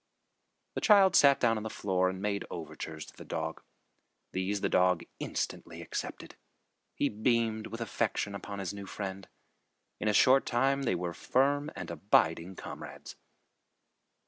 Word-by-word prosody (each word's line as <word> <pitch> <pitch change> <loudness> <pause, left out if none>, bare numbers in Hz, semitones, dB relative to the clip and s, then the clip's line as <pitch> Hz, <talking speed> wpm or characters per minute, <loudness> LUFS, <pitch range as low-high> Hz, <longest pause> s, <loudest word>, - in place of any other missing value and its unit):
The - - -3
child 195 -4 +6
sat 140 -1 +7
down 115 -2 +3
on - - -3
the 110 - -3
floor 95 -3 +1
and 95 0 -5
made 100 0 -1
overtures 80 -1 -6
to - - -15
the - - -10
dog. 80 0 -4 0.7
These 95 +2 -1
the - - +2
dog 90 -2 +3 0.2
instantly - - -4
accepted. - - -6 0.6
He 145 - +2
beamed 110 -1 0
with 115 +1 -7
affection 105 -2 -1
upon 100 0 -6
his 95 -1 -3
new 100 -1 -8
friend. 95 -1 -5 0.7
In 110 - -2
a 105 - +3
short 135 +3 +5
time 135 +3 +2
they 120 -9 +1
were 85 0 -3
firm 145 - +1
and - - -6
abiding 85 -2 +2
comrades. - - -8
100 Hz, 150 wpm, -31 LUFS, 95-120 Hz, 0.7 s, sat